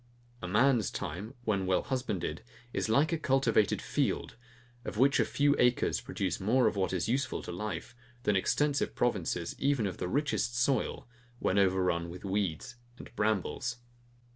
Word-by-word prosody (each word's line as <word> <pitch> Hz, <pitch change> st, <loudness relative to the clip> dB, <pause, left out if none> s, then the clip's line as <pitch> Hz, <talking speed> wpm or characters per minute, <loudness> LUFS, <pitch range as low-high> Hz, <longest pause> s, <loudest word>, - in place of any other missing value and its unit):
A 90 Hz, -, -4 dB
man's 120 Hz, +2 st, +3 dB
time, 105 Hz, +9 st, -5 dB
when 100 Hz, -5 st, 0 dB
well 95 Hz, -, +2 dB
husbanded, 125 Hz, -9 st, -3 dB, 0.3 s
is -, -, -1 dB
like 145 Hz, +9 st, +3 dB
a 165 Hz, -, 0 dB
cultivated 130 Hz, -8 st, +2 dB
field, -, -, -1 dB, 0.5 s
of 115 Hz, -, -6 dB
which 135 Hz, +4 st, +4 dB
a -, -, +4 dB
few 145 Hz, 0 st, +2 dB
acres 125 Hz, 0 st, +2 dB
produce -, -, -2 dB
more 120 Hz, +6 st, +3 dB
of -, -, +2 dB
what 95 Hz, -1 st, 0 dB
is 90 Hz, -1 st, -1 dB
useful 130 Hz, +2 st, -1 dB
to -, -, -6 dB
life, 100 Hz, +4 st, -5 dB, 0.3 s
than 105 Hz, -, +2 dB
extensive 140 Hz, +9 st, +1 dB
provinces, 90 Hz, -7 st, -1 dB
even 140 Hz, -5 st, +2 dB
of 95 Hz, -3 st, -3 dB
the -, -, -3 dB
richest 130 Hz, -2 st, 0 dB
soil, 125 Hz, -1 st, 0 dB, 0.3 s
when 100 Hz, -4 st, +1 dB
over 95 Hz, -1 st, +3 dB
run 85 Hz, -1 st, 0 dB
with 90 Hz, +3 st, -9 dB
weeds 95 Hz, +1 st, -2 dB, 0.2 s
and -, -, -12 dB
brambles. 110 Hz, +3 st, -1 dB
110 Hz, 165 wpm, -31 LUFS, 95-130 Hz, 0.5 s, which